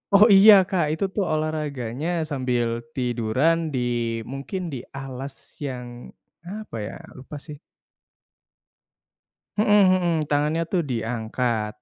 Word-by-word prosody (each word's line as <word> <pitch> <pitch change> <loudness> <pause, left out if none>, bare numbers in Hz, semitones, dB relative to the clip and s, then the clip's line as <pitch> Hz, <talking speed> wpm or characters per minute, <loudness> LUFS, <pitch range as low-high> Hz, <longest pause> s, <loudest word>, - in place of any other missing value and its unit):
Oh 205 - +8
iya 205 +2 +9 0.2
Kak, 185 -5 +1
itu 160 - -1
tuh 205 - +1
olahraganya 150 -4 -3 0.2
sambil 125 -3 0 0.3
tiduran 125 +5 +1 0.2
di 130 - 0 0.5
mungkin 140 +8 -5
di - - -3 0.2
alas 135 0 -6 0.3
yang, 125 -2 -5 0.6
apa 215 - -7
ya, - - -8 0.2
lupa 135 +3 -9
sih. 150 -2 -9 2.0
Mhm 210 - +3
mhm, 185 -4 +4
tangannya 150 +3 +1
tuh 180 -3 +1
diangkat. 115 -2 -2
140 Hz, 110 wpm, -24 LUFS, 125-170 Hz, 2.0 s, iya